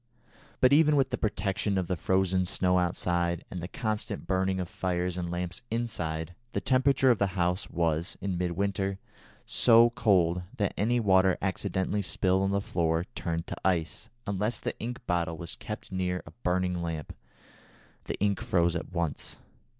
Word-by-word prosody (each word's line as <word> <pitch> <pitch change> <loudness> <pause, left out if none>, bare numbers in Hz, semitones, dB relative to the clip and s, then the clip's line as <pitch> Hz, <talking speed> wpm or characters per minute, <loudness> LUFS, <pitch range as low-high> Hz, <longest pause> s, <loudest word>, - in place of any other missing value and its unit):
But 130 +2 +6
even 150 0 +5
with 135 -2 +2
the - - 0
protection 100 -2 0
of 95 - +1
the 90 - -1
frozen 95 +1 +1
snow 90 0 +2
outside, 85 -1 0
and 90 - -5
the 85 - -4
constant 105 0 -3
burning 95 0 0
of 90 - -2
fires 90 0 -2
and 90 -1 -3
lamps 90 0 -3
inside, 90 -8 -2 0.2
the - - 0
temperature 130 0 +3
of 115 - +1
the 100 - +3
house 90 +2 0
was, 85 0 -1
in 95 -2 -2
midwinter, 95 +2 -1 0.5
so 115 0 +5
cold 95 -7 +3 0.2
that 100 -2 0
any 120 +4 +2
water 95 -3 +4
accidentally 95 +1 -1
spilled 95 0 +1
on 95 - +1
the 100 0 +1
floor 85 -3 0
turned 85 -1 -3
to - - -5
ice, 90 +3 0 0.2
and 100 -2 -2
unless 105 +4 -1
the - - -3
ink 120 +3 -5
bottle 85 -2 0
was 85 +3 -6
kept 105 -2 -7
near 90 -1 -1
a 75 - -11
burning 90 0 0
lamp, 80 -3 -4 0.9
the - - -4
ink 100 0 +1
froze 85 -1 +2
at 85 - -4
once. 85 -4 -3
95 Hz, 170 wpm, -29 LUFS, 85-100 Hz, 0.9 s, But